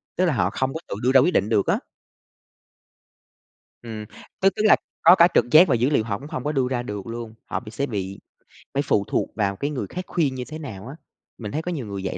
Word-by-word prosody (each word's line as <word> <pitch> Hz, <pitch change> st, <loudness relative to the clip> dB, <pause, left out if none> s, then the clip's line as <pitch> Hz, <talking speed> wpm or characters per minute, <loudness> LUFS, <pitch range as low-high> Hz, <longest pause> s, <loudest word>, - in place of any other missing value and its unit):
tức 185 Hz, -, +2 dB
là 165 Hz, -, +2 dB
họ 95 Hz, -6 st, +1 dB
không 130 Hz, +5 st, -2 dB
có 160 Hz, -, -4 dB
tự -, -, -4 dB
đưa 125 Hz, -, +3 dB
ra 135 Hz, -, +7 dB
quyết 175 Hz, +7 st, +3 dB
định 105 Hz, -, +2 dB
được 105 Hz, -4 st, +2 dB
á. -, -, +3 dB, 2.0 s
Ừm, 110 Hz, -2 st, -7 dB, 0.4 s
tức 195 Hz, -, +6 dB
tức 210 Hz, -, -1 dB
là -, -, +8 dB, 0.3 s
có 175 Hz, +3 st, +8 dB
cả 170 Hz, -1 st, +7 dB
trực -, -, +4 dB
giác 170 Hz, +4 st, +8 dB
và 135 Hz, -, +3 dB
dữ 125 Hz, +4 st, +2 dB
liệu 140 Hz, -7 st, +2 dB
họ 105 Hz, -1 st, -3 dB
cũng 145 Hz, -, -10 dB
hông 130 Hz, -, -5 dB
có 150 Hz, -, -1 dB
đưa 135 Hz, -4 st, +1 dB
ra 120 Hz, -2 st, -1 dB
được 105 Hz, -3 st, -6 dB
luôn, 115 Hz, -1 st, -6 dB
họ -, -, -3 dB
bị 110 Hz, -2 st, -11 dB
sẽ 140 Hz, +4 st, -2 dB
bị 100 Hz, -5 st, -4 dB, 0.5 s
phải 140 Hz, +1 st, +1 dB
phụ 100 Hz, -7 st, +1 dB
thuộc -, -, -1 dB
vào 100 Hz, -2 st, 0 dB
cái 140 Hz, +8 st, -2 dB
người 135 Hz, -, -3 dB
khác 180 Hz, +1 st, -5 dB
khuyên 145 Hz, -7 st, 0 dB
như 125 Hz, -, -4 dB
thế 155 Hz, +1 st, -7 dB
nào 110 Hz, -7 st, -8 dB
á. 140 Hz, -, -8 dB, 0.4 s
Mình 105 Hz, -4 st, -6 dB
thấy 155 Hz, -, -2 dB
có 180 Hz, +2 st, -4 dB
nhiều 140 Hz, -9 st, -4 dB
người 100 Hz, -1 st, -5 dB
vậy 90 Hz, -, -3 dB
125 Hz, 260 wpm, -23 LUFS, 105-150 Hz, 2.0 s, là